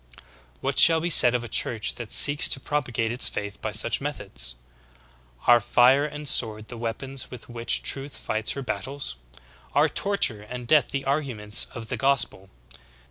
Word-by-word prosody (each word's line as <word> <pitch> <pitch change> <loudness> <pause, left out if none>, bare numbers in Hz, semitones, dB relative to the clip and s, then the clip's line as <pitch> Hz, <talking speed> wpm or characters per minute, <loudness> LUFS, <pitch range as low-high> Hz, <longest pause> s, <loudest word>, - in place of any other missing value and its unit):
"'^ - - -23
14. - - -20 0.4
What - - -1
shall 165 -1 +8
be 170 +2 -3
said 125 -5 +6
of 120 - -3
a - - -7
Church 110 0 -1
that 115 -3 -10
seeks 145 0 +6
to 135 - +4
propa 145 -1 -4
gate 115 0 -2
its 120 +2 +1
faith 100 0 -7
by - - -4
such - - -1
methods? - - -3 0.9
Are 120 0 +5
fire 125 +5 +2
and 150 0 -7
sword 110 -4 -1
the 120 - -9
weapons 130 +4 -5
with 125 -3 -12
which 120 0 -1
truth 135 0 -1
fights 110 0 -3
her 140 - -7
battles? 130 - -5 0.6
Are - - +3
torture 170 - +1
and 125 +3 -9
death 150 +4 +2
the 135 0 -4
arguments 130 -8 +1
of 115 -2 -8
the - - -4
gospel? 135 -8 -1
125 Hz, 185 wpm, -23 LUFS, 110-140 Hz, 0.9 s, shall